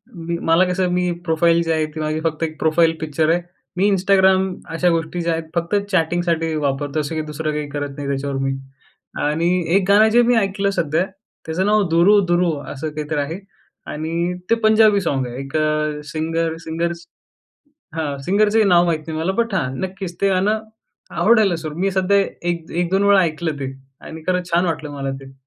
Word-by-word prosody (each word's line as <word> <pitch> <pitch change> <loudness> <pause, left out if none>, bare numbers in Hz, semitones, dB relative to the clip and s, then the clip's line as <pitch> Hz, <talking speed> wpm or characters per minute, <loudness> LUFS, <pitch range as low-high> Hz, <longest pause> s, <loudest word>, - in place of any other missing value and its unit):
मी 170 0 -4
मला 165 +3 +5
कसं 180 0 0
मी 180 0 +1
प्रोफाईल 170 0 +3
जी 165 - -1
आहे, 160 -1 +1
ती 155 +1 -8
माझी 155 0 -1
फक्त 160 -1 -1
एक 155 -1 -3
प्रोफाईल 165 +1 +3
पिक्चर 155 0 0
आहे. 170 +2 +2 0.4
मी 200 +3 +3
Instagram 190 0 +3 0.3
अशा 180 +2 +2
गोष्टी 165 +1 -1
ज्या 170 0 0
आहेत, 165 0 -2
फक्त 170 +4 0 0.2
चॅटिंगसाठी 165 -2 0
वापरतो, 140 +2 -1
असं 150 +2 -3
की 155 - -1
दुसरं 155 +1 -3
काही 150 -1 -3
करत 145 0 -4
नाही 145 -1 -5
त्याच्यावर 140 0 -2
मी. 135 0 0 0.7
आणि 155 +4 +1 0.3
1 195 - +4
गाणं 215 +2 +6
जे 240 - +7
मी 245 - +4
ऐकलं 195 -1 0
सध्या 165 +2 +1 0.4
त्याचं 160 +4 -1
नाव 210 +1 +3
'दुरू-दुरू' 175 0 +4 0.2
असं 150 +3 -4
काहीतरी 150 0 -2
आहे 155 +6 -3 0.5
आणि 165 +3 -2 0.2
ते 230 - +5
पंजाबी 215 -2 +5
सॉन्ग 135 -7 -1
आहे. 120 0 -7
एक 135 - -9
अ, 155 -1 0
सिंगर-सिंगर्स 165 +1 -3 0.9
हां, 150 -3 -2
सिंगरचंही 210 +4 +3
नाव 175 -3 +5
माहीत 165 -2 +1
नाही 160 -1 -4
मला. 165 +4 0
बट 230 -3 -5
हां, 145 -9 0
नक्कीच 190 -2 -5
ते 200 - +3
गाणं 200 +4 +1 0.6
आवडायला 215 -6 +4
सुरु 155 -2 -6
मी 195 +2 +1
सध्या 190 +1 +2 0.3
1-1-2 175 +3 -1
वेळा 200 -1 +5
ऐकलं 160 -1 -2
ते. 135 -1 -4 0.3
आणि 160 0 -9
खरंच 180 -1 0
छान 175 +2 +2
वाटलं 155 -3 -3
मला 140 -1 -4
ते. 135 0 -12
165 Hz, 180 wpm, -20 LUFS, 155-185 Hz, 0.9 s, जे